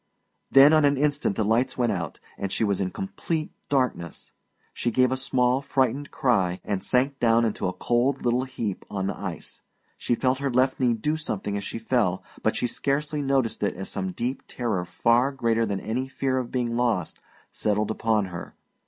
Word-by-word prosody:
Then 140 Hz, +3 st, +8 dB
on 155 Hz, -1 st, +5 dB
an 140 Hz, -1 st, +3 dB
instant 145 Hz, -7 st, +1 dB
the 110 Hz, -, +1 dB
lights 115 Hz, +4 st, +1 dB
went 120 Hz, -3 st, +2 dB
out, 90 Hz, -5 st, -4 dB, 0.2 s
and 100 Hz, -1 st, -4 dB
she -, -, 0 dB
was 100 Hz, -2 st, +1 dB
in 95 Hz, -, 0 dB
complete 170 Hz, -, -3 dB, 0.2 s
darkness. 125 Hz, -, -1 dB, 0.4 s
She 120 Hz, -, -1 dB
gave 130 Hz, +2 st, +3 dB
a -, -, +2 dB
small, 130 Hz, 0 st, +1 dB
frightened 135 Hz, 0 st, 0 dB
cry, 95 Hz, -8 st, +1 dB
and 100 Hz, -2 st, -2 dB
sank 135 Hz, +2 st, +1 dB
down 115 Hz, 0 st, +4 dB
into 110 Hz, -4 st, -1 dB
a 95 Hz, -, -2 dB
cold 125 Hz, +6 st, 0 dB
little 125 Hz, +2 st, +2 dB
heap 115 Hz, -7 st, -4 dB
on 95 Hz, -2 st, -2 dB
the 100 Hz, -, -2 dB
ice. 95 Hz, -5 st, -7 dB, 0.4 s
She 120 Hz, -, +1 dB
felt 130 Hz, +2 st, +1 dB
her 140 Hz, 0 st, -1 dB
left 130 Hz, +1 st, +2 dB
knee 120 Hz, -2 st, +3 dB
do 150 Hz, +8 st, -1 dB
something 105 Hz, -9 st, -3 dB
as 100 Hz, -, -3 dB
she 105 Hz, -, -5 dB
fell, 110 Hz, -5 st, 0 dB, 0.2 s
but -, -, +1 dB
she -, -, 0 dB
scarcely 145 Hz, +4 st, -1 dB
noticed 135 Hz, -4 st, 0 dB
it 100 Hz, -, 0 dB
as 95 Hz, +2 st, -5 dB
some 95 Hz, 0 st, -3 dB
deep 125 Hz, +6 st, -3 dB
terror 110 Hz, -8 st, -2 dB
far 115 Hz, +8 st, +2 dB
greater 115 Hz, -4 st, +1 dB
than 100 Hz, -1 st, -2 dB
any 125 Hz, +6 st, -2 dB
fear 130 Hz, 0 st, -1 dB
of 125 Hz, -2 st, -5 dB
being 120 Hz, -2 st, -1 dB
lost 115 Hz, -8 st, 0 dB, 0.3 s
settled 105 Hz, 0 st, 0 dB
upon 110 Hz, -2 st, +1 dB
her. 85 Hz, -, -7 dB
120 Hz, 195 wpm, -25 LUFS, 105-135 Hz, 0.4 s, Then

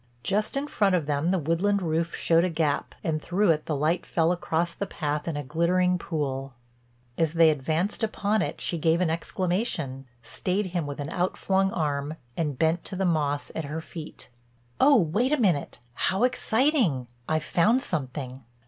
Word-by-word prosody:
Just 210 Hz, +6 st, 0 dB
in 280 Hz, -, -1 dB
front 200 Hz, -9 st, +2 dB
of 165 Hz, -5 st, 0 dB
them 145 Hz, +3 st, 0 dB
the 190 Hz, -, +2 dB
woodland 180 Hz, +5 st, +1 dB
roof 165 Hz, +1 st, -1 dB
showed 165 Hz, 0 st, +3 dB
a 185 Hz, -, +1 dB
gap, 155 Hz, -3 st, -1 dB
and 155 Hz, -2 st, -1 dB
through 185 Hz, +2 st, +2 dB
it 155 Hz, -1 st, -1 dB
the 155 Hz, -, 0 dB
light 160 Hz, +5 st, +1 dB
fell 165 Hz, 0 st, +1 dB
across 170 Hz, -1 st, -1 dB
the 200 Hz, -, -4 dB
path 150 Hz, 0 st, -3 dB
in 160 Hz, -3 st, -2 dB
a 145 Hz, -, -3 dB
glittering 180 Hz, +5 st, +1 dB
pool. 135 Hz, -5 st, -3 dB, 0.6 s
As 165 Hz, -1 st, +2 dB
they 165 Hz, -1 st, +6 dB
advanced 160 Hz, +7 st, -1 dB
upon 215 Hz, -1 st, +1 dB
it -, -, -3 dB
she 170 Hz, -, -1 dB
gave 165 Hz, +2 st, +3 dB
an 180 Hz, -3 st, +1 dB
exclamation, 170 Hz, -, -2 dB, 0.2 s
stayed 190 Hz, -, -1 dB
him 170 Hz, -5 st, -1 dB
with 145 Hz, 0 st, -6 dB
an 145 Hz, +2 st, -4 dB
outflung 190 Hz, +2 st, +1 dB
arm, 145 Hz, -2 st, -2 dB, 0.2 s
and 150 Hz, -5 st, -2 dB
bent 160 Hz, +3 st, +1 dB
to -, -, -3 dB
the 190 Hz, +1 st, 0 dB
moss 145 Hz, -4 st, 0 dB
at 160 Hz, -, -3 dB
her 150 Hz, +3 st, -4 dB
feet: 160 Hz, -1 st, -9 dB, 0.5 s
"Oh, 280 Hz, +1 st, +6 dB
wait 215 Hz, -, +2 dB
a 300 Hz, -, +3 dB
minute—How 175 Hz, -, 0 dB
exciting! 245 Hz, -, +2 dB, 0.2 s
I've 155 Hz, 0 st, +1 dB
found 225 Hz, +9 st, +3 dB
something." 130 Hz, -4 st, -4 dB
165 Hz, 175 wpm, -26 LUFS, 150-190 Hz, 0.6 s, they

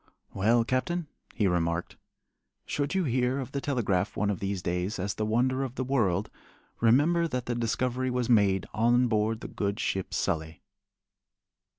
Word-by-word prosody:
"Well, 115 Hz, +4 st, +3 dB
Captain," 160 Hz, +8 st, -1 dB, 0.3 s
he 105 Hz, -, +1 dB
remarked, 85 Hz, -2 st, 0 dB, 0.7 s
"should 145 Hz, +5 st, -2 dB
you 190 Hz, -, +2 dB
hear 125 Hz, -2 st, +1 dB
of 130 Hz, -1 st, -5 dB
the 140 Hz, -, -3 dB
telegraph 105 Hz, -9 st, 0 dB
one 105 Hz, -1 st, +1 dB
of 100 Hz, -, -3 dB
these 100 Hz, -2 st, -3 dB
days 90 Hz, +4 st, -1 dB
as 100 Hz, +2 st, -2 dB
the 110 Hz, -, -2 dB
wonder 130 Hz, +4 st, +1 dB
of 130 Hz, -2 st, -4 dB
the 130 Hz, -, -2 dB
world, 110 Hz, -8 st, 0 dB, 0.5 s
remember 150 Hz, +9 st, +4 dB
that 125 Hz, -5 st, -3 dB
the 120 Hz, -, -1 dB
discovery 125 Hz, +2 st, -1 dB
was 125 Hz, -1 st, -1 dB
made 100 Hz, -5 st, +3 dB
on 120 Hz, +3 st, +3 dB
board 110 Hz, +1 st, 0 dB
the -, -, -5 dB
good 100 Hz, 0 st, -2 dB
ship 95 Hz, -1 st, -2 dB
Sully." 80 Hz, 0 st, -2 dB
115 Hz, 165 wpm, -28 LUFS, 100-130 Hz, 0.7 s, remember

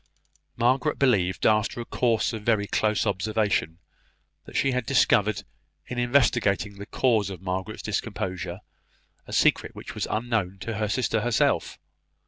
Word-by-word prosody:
Margaret 125 Hz, +5 st, +2 dB
believed, 95 Hz, -9 st, +2 dB
after 110 Hz, +2 st, +2 dB
a 120 Hz, -, -4 dB
course 115 Hz, -2 st, +1 dB
of 110 Hz, -, -5 dB
very 105 Hz, -2 st, +1 dB
close 105 Hz, +1 st, +1 dB
observation, 100 Hz, -4 st, 0 dB, 0.7 s
that -, -, -12 dB
she 135 Hz, -, +2 dB
had 125 Hz, -1 st, 0 dB
discovered, 110 Hz, -5 st, +3 dB, 0.4 s
in 120 Hz, -, -4 dB
investigating 120 Hz, -5 st, +2 dB
the 100 Hz, -, -7 dB
cause 110 Hz, -7 st, +1 dB
of 95 Hz, -, -7 dB
Hester's 95 Hz, +3 st, -4 dB
discomposure, 95 Hz, -4 st, -3 dB, 0.7 s
a -, -, -10 dB
secret -, -, +2 dB
which -, -, -8 dB
was -, -, -3 dB
unknown 110 Hz, -5 st, -1 dB
to 110 Hz, +1 st, -4 dB
her 105 Hz, -1 st, 0 dB
sister 115 Hz, -1 st, 0 dB
herself. 120 Hz, 0 st, +1 dB
110 Hz, 140 wpm, -26 LUFS, 100-120 Hz, 0.7 s, discovered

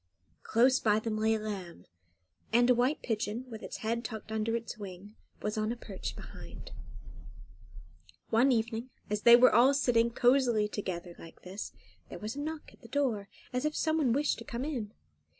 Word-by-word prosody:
Close 255 Hz, +3 st, +4 dB
by 210 Hz, -1 st, +3 dB
them 220 Hz, 0 st, -2 dB
lay 220 Hz, +1 st, +2 dB
a -, -, -2 dB
lamb, 190 Hz, -, -6 dB, 0.7 s
and 240 Hz, +2 st, +5 dB
a -, -, +7 dB
white 250 Hz, +5 st, +1 dB
pigeon, 225 Hz, +1 st, -2 dB
with 220 Hz, -, -7 dB
its -, -, -6 dB
head 230 Hz, +1 st, 0 dB
tucked 220 Hz, -1 st, -7 dB
under 220 Hz, +1 st, 0 dB
its 230 Hz, 0 st, -4 dB
wing, 200 Hz, 0 st, -9 dB, 0.3 s
was 210 Hz, +1 st, -1 dB
on 215 Hz, +1 st, 0 dB
a -, -, -2 dB
perch 200 Hz, -5 st, -6 dB
behind. -, -, -10 dB, 1.6 s
One 245 Hz, +5 st, +5 dB
evening, 230 Hz, +1 st, -1 dB, 0.2 s
as 210 Hz, 0 st, 0 dB
they 235 Hz, +1 st, +9 dB
were 250 Hz, +1 st, +6 dB
all 255 Hz, +5 st, +6 dB
sitting 235 Hz, -4 st, +3 dB
cosily 240 Hz, -3 st, +3 dB
together 180 Hz, -4 st, -5 dB
like 165 Hz, -, -13 dB
this, 190 Hz, +3 st, -6 dB, 0.4 s
there -, -, -7 dB
was 215 Hz, +3 st, -5 dB
a -, -, -5 dB
knock 310 Hz, +1 st, -6 dB
at -, -, -21 dB
the -, -, -12 dB
door, 240 Hz, -9 st, -1 dB, 0.2 s
as 250 Hz, -, -1 dB
if 305 Hz, 0 st, -1 dB
someone 315 Hz, -5 st, +2 dB
wished 285 Hz, +4 st, +1 dB
to -, -, -7 dB
come 245 Hz, +2 st, -4 dB
in. 240 Hz, -9 st, -3 dB
230 Hz, 185 wpm, -31 LUFS, 210-250 Hz, 1.6 s, they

